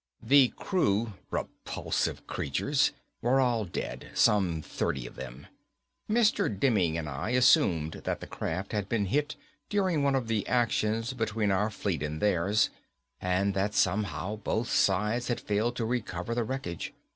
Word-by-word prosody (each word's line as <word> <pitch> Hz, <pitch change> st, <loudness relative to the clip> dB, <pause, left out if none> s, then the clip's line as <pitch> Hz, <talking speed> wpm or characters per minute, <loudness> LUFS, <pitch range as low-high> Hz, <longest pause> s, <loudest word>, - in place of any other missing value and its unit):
The 135 Hz, +3 st, +6 dB
crew 115 Hz, -, 0 dB, 0.2 s
repulsive -, -, -3 dB
creatures 135 Hz, -, 0 dB, 0.3 s
were 125 Hz, +3 st, +3 dB
all 120 Hz, -4 st, +2 dB
dead. 90 Hz, -, -5 dB
Some 90 Hz, -7 st, +3 dB
thirty 65 Hz, -3 st, -2 dB
of -, -, -10 dB
them. 65 Hz, +4 st, -8 dB, 0.6 s
Mr. 220 Hz, 0 st, +3 dB
Demming 100 Hz, -6 st, +1 dB
and 80 Hz, -2 st, -3 dB
I 75 Hz, +9 st, -4 dB
assumed 90 Hz, -, +3 dB
that -, -, -1 dB
the -, -, -7 dB
craft 95 Hz, +5 st, -4 dB
had 105 Hz, -2 st, -2 dB
been 110 Hz, -3 st, +1 dB
hit 145 Hz, +8 st, 0 dB, 0.3 s
during 190 Hz, -7 st, +1 dB
one 140 Hz, -1 st, +2 dB
of 130 Hz, -4 st, -1 dB
the 110 Hz, -3 st, -1 dB
actions 115 Hz, -1 st, +1 dB
between 110 Hz, -3 st, 0 dB
our 100 Hz, +3 st, +2 dB
fleet 100 Hz, -7 st, -2 dB
and 75 Hz, +1 st, -3 dB
theirs 100 Hz, +2 st, +2 dB, 0.5 s
and 95 Hz, +2 st, +1 dB
that 100 Hz, +2 st, -1 dB
somehow 105 Hz, +2 st, 0 dB
both 110 Hz, +3 st, -2 dB
sides 105 Hz, +5 st, +2 dB
had 120 Hz, -, -1 dB
failed 110 Hz, +4 st, 0 dB
to 115 Hz, -, -1 dB
recover 110 Hz, -4 st, -2 dB
the 120 Hz, -1 st, 0 dB
wreckage. 110 Hz, -9 st, -4 dB
105 Hz, 150 wpm, -29 LUFS, 95-120 Hz, 0.6 s, The